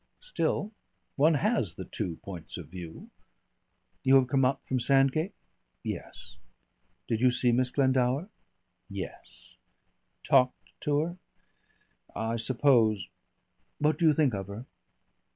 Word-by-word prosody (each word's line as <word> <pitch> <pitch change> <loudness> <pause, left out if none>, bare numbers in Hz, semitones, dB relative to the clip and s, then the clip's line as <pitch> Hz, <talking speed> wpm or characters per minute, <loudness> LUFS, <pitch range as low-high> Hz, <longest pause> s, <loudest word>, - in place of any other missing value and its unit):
Still - - -1 0.4
one 155 +3 +4
has 145 - 0
the 95 - -7
two 90 -7 -3
points 90 -5 -7
of - - -9
view.... 85 -3 -9 0.9
You 135 +1 +5
have 130 -2 +5
come 135 -1 +2
up 135 +2 +1
from 130 - 0
Sandgate?" 135 +7 +2 0.5
"Yes." - - -7 0.7
"Did 110 - -1
you 130 - +6
see 125 0 +2
Miss 125 +1 +2
Glendower?" 130 +3 +1 0.6
"Yes." - - -8 0.7
"Talked 130 -3 +2
to 145 -1 +1
her?... 175 +3 -4 1.0
I 115 +1 -1
suppose 115 -4 +2 0.7
What 150 +3 +1
do 165 - +4
you 155 - +6
think 145 -4 +2
of 95 -2 -4
her?" 105 +5 -8
130 Hz, 125 wpm, -29 LUFS, 110-145 Hz, 1.0 s, you